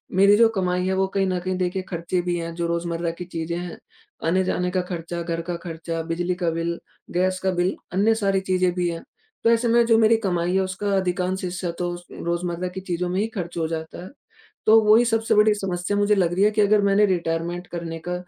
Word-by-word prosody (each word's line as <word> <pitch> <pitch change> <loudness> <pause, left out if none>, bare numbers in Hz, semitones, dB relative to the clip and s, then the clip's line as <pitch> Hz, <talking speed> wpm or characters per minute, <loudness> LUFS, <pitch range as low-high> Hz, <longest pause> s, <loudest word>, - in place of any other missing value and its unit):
मेरी 200 +2 +6
जो 230 -1 +6
कमाई 180 -3 -1
है 190 - +1
वो 190 0 +1
कहीं 195 -1 +2
न 185 -1 0
कहीं 185 +1 -2
देखिए 185 +1 -1
ख़र्चे 175 +1 -2
भी 175 0 -1
हैं 165 0 -5
जो 170 -1 -1
रोज़मर्रा 170 0 -2
की 175 +1 -8
चीज़ें 170 -1 -4
हैं। 175 -1 -6 0.5
आने-जाने 180 +1 +1
का 185 0 +1
ख़र्चा, 175 -1 -5
घर 165 0 -3
का 175 +1 -4
ख़र्चा, 165 -1 -4
बिजली 175 +2 -2
का 175 -2 -1
बिल, 165 +1 -2 0.3
गैस 185 +1 +1
का 190 - +2
बिल, 180 +1 0 0.2
अन्य 210 +4 +3
सारी 195 -3 +1
चीज़ें 185 -1 +1
भी 180 -1 0
हैं, 165 -1 -5 0.4
तो 230 - +4
ऐसे 235 +1 +3
में 235 0 +4
जो 230 -1 +4
मेरी 225 0 +5
कमाई 175 -1 0
है - - +4
उसका 190 +2 -1
अधिकांश 185 0 -1
हिस्सा 180 0 -3
तो 175 - -1
उस 175 0 -9
रोज़मर्रा 170 +1 -3
की 185 +1 -7
चीज़ों 175 0 -1
में 185 +2 -1
ही 215 - +1
ख़र्च 175 -3 -5
हो 160 -1 0
जाता 160 +1 -6
है। 185 - -9 0.6
तो 220 +1 +7
वो 210 0 +6
ही 240 - +5
सबसे 225 -1 +1
बड़ी 210 0 +5
समस्या 190 -1 -2
मुझे 205 +1 +3
लग 180 -4 +1
रही 190 +3 +3
है 210 - +5
कि 215 0 0
अगर 205 0 +4
मैंने 200 +1 +4
रिटायरमेंट 175 -1 -2
करने 165 -1 -5
का 180 - -1
180 Hz, 235 wpm, -23 LUFS, 170-195 Hz, 0.6 s, तो